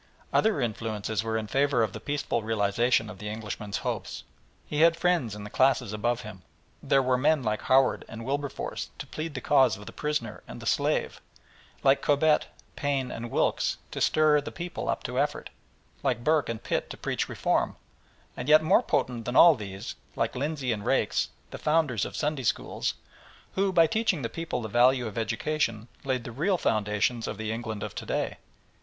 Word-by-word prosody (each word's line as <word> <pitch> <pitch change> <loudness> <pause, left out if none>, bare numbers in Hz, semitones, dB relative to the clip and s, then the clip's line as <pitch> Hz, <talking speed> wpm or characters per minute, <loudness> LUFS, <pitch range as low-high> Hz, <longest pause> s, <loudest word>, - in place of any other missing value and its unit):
Other 220 -8 +3
influences 110 -2 -2
were 110 0 -1
in 110 - -2
favour 135 +1 +2
of 105 -3 -2
the - - -6
peaceful 145 -5 -2
realisation 110 +2 +1
of 105 -3 -9
the 105 - -6
Englishman's 105 -2 -4
hopes. - - -3 0.4
He 150 0 -1
had 165 0 +6
friends 170 - +1
in 105 - -8
the 105 - -8
classes 130 -5 +2
above 120 +3 0
him. 105 -5 -9 0.4
There 135 -1 +3
were 125 0 +2
men 150 0 +3
like 105 -1 -1
Howard 130 0 +3
and 115 0 -7
Wilberforce 140 +1 -3
to - - -6
plead 155 -1 -5
the 130 - -3
cause 135 -6 +4
of 105 - -11
the - - -8
prisoner 150 -8 -3
and - - -8
the - - -9
slave, - - 0 0.6
like 135 0 +4
Cobbett, 150 +1 +3 0.3
Paine, 140 -3 -1
and 120 +1 -5
Wilkes - - +1
to - - -5
stir 155 -1 +4
the - - -7
people 175 0 -5
up - - -1
to - - -2
effort, - - -1 0.5
like 125 -4 0
Burke 155 -1 +2
and 115 -1 -4
Pitt - - -1
to - - -7
preach - - -2
reform, - - 0 0.6
and 125 - -4
yet 155 +1 +7
more 185 +8 +5
potent 120 - -1
than 125 - -3
all 170 -1 +9
these, 100 -4 -6 0.2
like 115 +1 -1
Lindsey 140 -1 -1
and 105 -2 -2
Raikes, - - +1 0.2
the - - -7
founders 150 - +1
of - - -7
Sunday 150 -2 -1
Schools, 120 - -1 0.6
who, 195 0 +1
by 165 -3 +6
teaching 215 - 0
the 115 - -1
people 165 -7 -4
the - - -3
value 125 +3 +4
of 110 - -6
education, 115 -2 -1
laid 130 -3 -1
the 120 - -7
real 165 - +1
foundations 110 - 0
of 105 - -4
the 110 0 -3
England 110 -2 -4
of 105 - -5
to - - -7
day. - - -1
125 Hz, 190 wpm, -28 LUFS, 110-150 Hz, 0.6 s, all